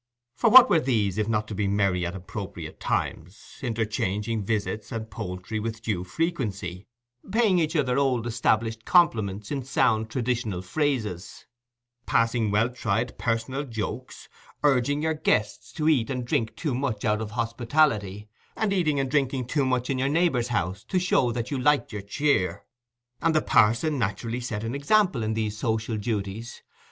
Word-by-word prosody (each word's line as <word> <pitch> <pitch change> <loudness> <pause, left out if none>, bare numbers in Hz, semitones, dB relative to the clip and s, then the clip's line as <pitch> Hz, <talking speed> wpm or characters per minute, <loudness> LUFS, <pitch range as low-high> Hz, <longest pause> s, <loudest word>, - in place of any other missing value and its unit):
For 230 - +3
what 255 +2 +10
were 165 - +4
these 110 - 0
if 105 - 0
not 105 -1 0
to - - -4
be 100 0 -1
merry 100 -3 +1
at 90 - -6
appropriate 95 -3 -7
times, 90 +7 -4
interchanging 110 -2 -1
visits 105 +1 -2
and 110 -2 -5
poultry 95 +4 -5
with 115 +1 -5
due 100 -6 -1
frequency, 100 - -3 0.4
paying 215 -4 +3
each 160 0 0
other 135 -4 +2
old 130 -4 +1
established 115 -1 0
compliments 105 - +2
in 140 -2 -1
sound 110 -4 +1
traditional 115 -6 -2
phrases, 110 - -2 0.6
passing 115 -1 +2
well 110 +4 +2
tried 115 -1 -1
personal 120 +4 -1
jokes, 115 -7 -6 0.4
urging 145 +1 +2
your 160 0 +1
guests 105 -8 0
to 155 - -1
eat 140 -7 +3
and 125 -2 -3
drink 110 -2 -1
too 150 0 -2
much 125 -5 -2
out 105 0 +1
of 110 - -4
hospitality, 115 -3 0 0.3
and 215 -2 0
eating 155 -7 +1
and 135 -1 -1
drinking 135 -3 +1
too 140 +3 0
much 125 -1 0
in 135 -2 -1
your 135 +1 +1
neighbour's 150 -6 +2
house 95 -4 -2
to 190 - -1
show 175 -9 +2
that 115 +2 -4
you 140 - -1
liked 145 -2 +2
your 105 - -4
cheer? 100 - 0 0.6
And 165 -1 +2
the 155 - +4
parson 125 +7 +3
naturally 115 +3 -2
set 110 -4 -4
an 115 +2 -3
example 175 - +2
in 110 0 -1
these 110 -1 -2
social 110 -1 -1
duties. 105 +1 -4
115 Hz, 165 wpm, -26 LUFS, 105-135 Hz, 0.6 s, what